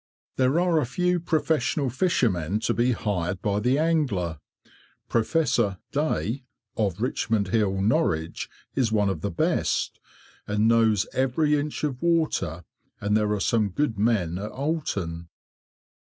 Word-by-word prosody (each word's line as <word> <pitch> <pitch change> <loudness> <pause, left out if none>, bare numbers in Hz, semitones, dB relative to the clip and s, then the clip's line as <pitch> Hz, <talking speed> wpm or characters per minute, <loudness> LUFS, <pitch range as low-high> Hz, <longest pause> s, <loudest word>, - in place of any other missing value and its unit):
There 130 +5 +2
are 175 -2 +3
a - - 0
few 180 +6 +1
professional 150 -5 0
fishermen 110 - +1
to - - +1
be 120 +2 +2
hired 95 -5 -2
by 100 0 +1
the 125 +5 +2
angler. 130 - 0 0.7
"Professor" 120 - +1
Day, 140 -4 -1 0.3
of 100 -4 -1
Richmond 110 -5 0
Hill, 100 -2 +1
Norwich, 95 - 0 0.2
is 125 -5 +1
one 105 -2 +2
of 95 - -3
the 100 - -1
best, 85 - 0 0.5
and 105 +1 +2
knows 110 -3 +4
every 140 +4 +2
inch 150 +1 -3
of 135 -4 -2
water, 155 - 0 0.4
and 105 +1 0
there 105 -1 +2
are 105 - 0
some 105 +1 +1
good 110 0 -1
men 95 -6 +1
at 105 +2 -5
Oulton. 100 - -3
115 Hz, 140 wpm, -25 LUFS, 100-145 Hz, 0.7 s, knows